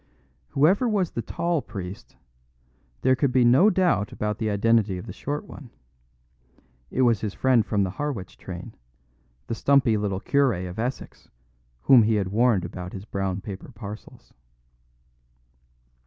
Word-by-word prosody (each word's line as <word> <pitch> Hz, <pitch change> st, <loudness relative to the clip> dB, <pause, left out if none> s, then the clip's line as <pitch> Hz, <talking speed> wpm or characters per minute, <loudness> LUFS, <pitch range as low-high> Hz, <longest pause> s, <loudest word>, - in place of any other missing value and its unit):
Whoever 185 Hz, -, +3 dB
was 195 Hz, -6 st, 0 dB
the 115 Hz, -, -3 dB
tall 170 Hz, +7 st, -1 dB
priest, 100 Hz, +1 st, -8 dB, 0.9 s
there 130 Hz, 0 st, +4 dB
could 135 Hz, 0 st, +1 dB
be 125 Hz, -1 st, +4 dB
no 135 Hz, -, +6 dB
doubt 180 Hz, -, +1 dB
about 105 Hz, 0 st, -3 dB
the 110 Hz, -2 st, -1 dB
identity 105 Hz, -1 st, +2 dB
of 90 Hz, -, -8 dB
the 100 Hz, -, -8 dB
short 145 Hz, +7 st, -4 dB
one. 135 Hz, -5 st, -12 dB, 1.2 s
It 130 Hz, -, +1 dB
was 115 Hz, -5 st, +3 dB
his 105 Hz, -2 st, -4 dB
friend 130 Hz, -4 st, +3 dB
of 105 Hz, -2 st, +2 dB
the 95 Hz, -, -1 dB
Harwich 125 Hz, -4 st, -5 dB
train, 90 Hz, +4 st, -9 dB, 0.7 s
the -, -, -4 dB
stumpy 125 Hz, -2 st, +3 dB
little 100 Hz, -2 st, -2 dB
cure 140 Hz, +2 st, +2 dB
of 90 Hz, +4 st, -8 dB
Essex 125 Hz, +3 st, -5 dB, 0.5 s
whom 130 Hz, -3 st, +7 dB
he 110 Hz, 0 st, +2 dB
had 100 Hz, -3 st, -1 dB
warned 110 Hz, -3 st, +2 dB
about 90 Hz, +1 st, -7 dB
his 95 Hz, +1 st, -7 dB
brown 95 Hz, -2 st, -3 dB
paper 100 Hz, +5 st, -8 dB
parcels. 105 Hz, -1 st, -10 dB
115 Hz, 150 wpm, -25 LUFS, 100-130 Hz, 1.2 s, whom